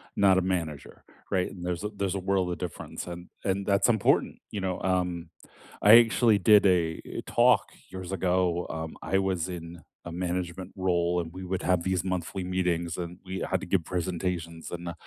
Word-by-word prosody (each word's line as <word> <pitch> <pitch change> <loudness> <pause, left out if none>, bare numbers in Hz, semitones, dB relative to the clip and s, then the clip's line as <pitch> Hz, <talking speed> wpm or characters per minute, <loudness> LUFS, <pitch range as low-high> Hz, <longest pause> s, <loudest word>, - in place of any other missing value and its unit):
not 95 -2 +5
a 95 - +4
manager, 85 -6 -3 0.3
right, 90 -1 +1
and 90 -2 -8
there's 90 +1 -2
a 105 - -1
there's 100 -1 -1
a - - -1
world 95 -1 0
of 85 - -3
difference 90 -1 -6
and 85 0 -8
and 100 0 -1
that's 100 -1 +3
important, 110 -4 +2 0.2
you 105 - -3
know, 95 -1 -2
um, 90 -2 -1 0.5
I 105 +3 +9
actually 115 -1 +4
did 105 +1 +6
a 85 -4 +2 0.2
talk - - +4 0.2
years 95 -1 -7
ago, 90 -2 +1
um, 80 0 -5
I 95 - 0
was 95 -3 0
in 85 -1 -7 0.2
a 85 - -6
management 90 +1 -3
role 90 -2 +1
and 80 0 -8
we 95 - -7
would 95 +1 -3
have 90 -2 +2
these 95 -2 0
monthly 95 0 -3
meetings 90 -2 -1
and 85 0 -5
we 95 +1 -4
had 95 - +1
to - - -5
give 90 -2 +1
presentations 85 -2 -3
and 85 0 -5
90 Hz, 185 wpm, -28 LUFS, 85-95 Hz, 0.5 s, I